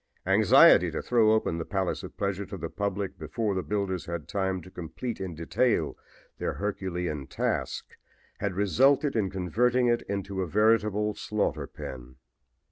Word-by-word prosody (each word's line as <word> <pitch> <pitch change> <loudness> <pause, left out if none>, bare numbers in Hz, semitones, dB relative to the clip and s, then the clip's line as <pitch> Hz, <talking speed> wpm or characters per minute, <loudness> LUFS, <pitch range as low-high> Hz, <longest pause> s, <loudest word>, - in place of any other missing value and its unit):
Anxiety - - +6
to - - -3
throw 115 -3 +4
open 110 -6 +1
the - - -2
palace 95 0 -2
of - - -10
pleasure 100 -1 -2
to 95 0 -6
the 80 -1 -5
public 100 -1 -3
before 115 -5 -2
the 95 - -1
builders 100 -3 -2
had 85 -3 -5
time 95 -2 -1
to 95 - -13
complete 95 +7 -6
in 90 -3 -4
detail 110 +10 0 0.4
their - - -1
Herculean 90 -8 -3
task - - -2 0.5
had 100 -3 -2
resulted 135 - +3
in 105 -4 +1
converting 115 +7 +1
it 120 -1 +2
into 100 -1 -3
a 90 - -2
veritable 105 +2 +2
slaughter 105 0 -2
pen. 65 -1 -9
100 Hz, 155 wpm, -28 LUFS, 90-110 Hz, 0.5 s, Anxiety